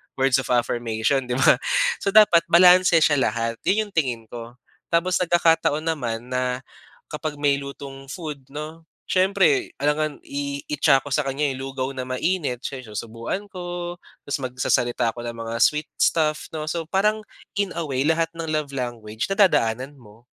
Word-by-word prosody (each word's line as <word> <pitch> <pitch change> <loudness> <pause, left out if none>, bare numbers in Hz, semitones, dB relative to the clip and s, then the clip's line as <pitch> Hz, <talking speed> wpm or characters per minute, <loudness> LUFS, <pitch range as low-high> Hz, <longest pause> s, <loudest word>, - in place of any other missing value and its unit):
words 135 0 +3
of 135 - -4
affirmation 120 +2 0
'di 125 - -1
ba? 130 -1 +5 0.4
So - - -5
dapat 195 -6 +6
balanse 180 -1 +6
siya 145 -2 +3
lahat, 115 -1 -1
yun 215 +1 +2
yung - - -25
tingin 125 -8 0
ko. 120 0 -8 0.3
Tapos 175 +2 +1
nagkakataon 165 -3 +2
naman 125 -7 -3
na, 125 0 -1 0.5
kapag 150 0 -4
may 145 -1 +1
lutong 140 -1 -9
food 150 -1 -6
no, 155 +3 -8 0.2
siyempre 270 - +2
alangan 150 +1 0
iitsa 140 -1 +1
ko - - -6
sa 150 - +2
kanya 140 +2 0
yung 130 0 -5
lugaw 130 0 -3
na 130 - -3
mainit, 130 0 -1
siya 135 -2 -5
yung 110 - -13
isusubuan 115 - -5
ko, 175 -1 -5 0.3
tas 145 - -1
magsasalita 120 -2 0
ako 120 - -7
ng 120 -1 -6
mga 115 - -3
sweet 150 +1 +2
stuff 155 -2 +1
no. 155 -1 -4
So 165 +1 -2
parang, 210 +3 +1 0.4
in 200 -2 0
away 140 -6 -1
lahat 165 0 +1
ng 165 -1 -5
love 150 -2 -1
language 115 - -4
nadadaanan 140 - +2
mo. 110 +1 -18
145 Hz, 160 wpm, -23 LUFS, 125-165 Hz, 0.5 s, dapat